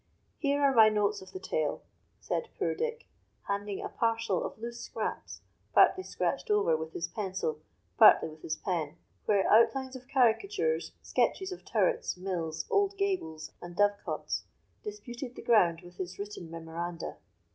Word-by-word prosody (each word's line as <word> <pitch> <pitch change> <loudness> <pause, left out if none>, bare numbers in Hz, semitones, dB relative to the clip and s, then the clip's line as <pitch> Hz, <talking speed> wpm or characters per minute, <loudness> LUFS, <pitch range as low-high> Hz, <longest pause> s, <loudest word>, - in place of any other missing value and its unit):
Here 285 -1 +1
are 275 -1 +5
my 220 -3 +8
notes 210 -1 +1
of 190 0 -12
the 185 - -6
tale," 155 -5 -1 0.4
said 470 - -2
poor - - 0
Dick, 470 0 -3 0.4
handing 200 0 -2
a - - -4
parcel 230 -5 0
of - - -5
loose 235 +1 -6
scraps, - - -5 0.3
partly 375 0 +6
scratched - - -2
over 415 - +3
with 160 0 -5
his - - -2
pencil, 190 -7 -3 0.4
partly - - +8
with 155 0 -13
his 160 - -2
pen, 165 -6 -2 0.3
where 200 -2 +3
outlines 260 +4 +4
of 255 -1 -10
caricatures, 390 - +2
sketches 380 0 0
of 370 - -7
turrets, 475 - +1
mills, 165 -4 -3
old 400 0 +2
gables, 370 - -2
and 175 0 -8
dovecots, 205 +1 0 0.4
disputed 260 - -7
the - - -9
ground 175 -8 +4
with 175 0 -14
his 185 0 -5
written 200 -4 -6
memoranda. 165 +1 -5
210 Hz, 155 wpm, -30 LUFS, 175-275 Hz, 0.4 s, my